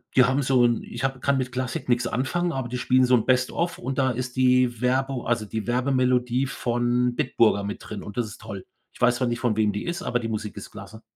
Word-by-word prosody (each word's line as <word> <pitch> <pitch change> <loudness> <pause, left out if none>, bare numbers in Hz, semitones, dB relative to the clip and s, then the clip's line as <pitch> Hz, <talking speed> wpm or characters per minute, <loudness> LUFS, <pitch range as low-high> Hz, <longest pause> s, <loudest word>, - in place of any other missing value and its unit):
die 130 - +7
haben 135 +3 +1
so 130 -2 +3
'n 120 -1 +1
ich 120 +3 -7
habe 135 -1 -1
kann 140 +1 +1
mit 125 -1 -3
Klassik 130 -1 -4
nichts 120 0 +2
anfangen, 170 +9 -1
aber 130 -2 -3
die 125 - -3
spielen 130 0 +3
so 125 0 +4
'n 115 - +1
Best 130 0 +2
of 170 0 -2
und 130 +2 -4
da 130 -1 +2
ist 125 0 -4
die 125 -2 +3
Werbu 130 0 0
also, 115 -2 0
die 110 +1 -4
Werbemelodie 125 0 +1
von 120 -1 0
Bitburger 110 -3 +2
mit 100 +1 -4
drin 105 -2 -6
und 105 - -9
das 120 -3 0
ist 105 - -11
toll. 100 -1 -7 0.3
Ich - - -18
weiß 125 0 +4
zwar 125 -1 0
nicht, 120 0 -2
von 115 -4 0
wem 105 -2 +2
die 105 - -4
ist, 175 +2 -3
aber 120 - 0
die 115 -1 -4
Musik 110 -1 -4
ist - - -8
klasse.“ 105 +2 -11
125 Hz, 255 wpm, -25 LUFS, 115-130 Hz, 0.3 s, die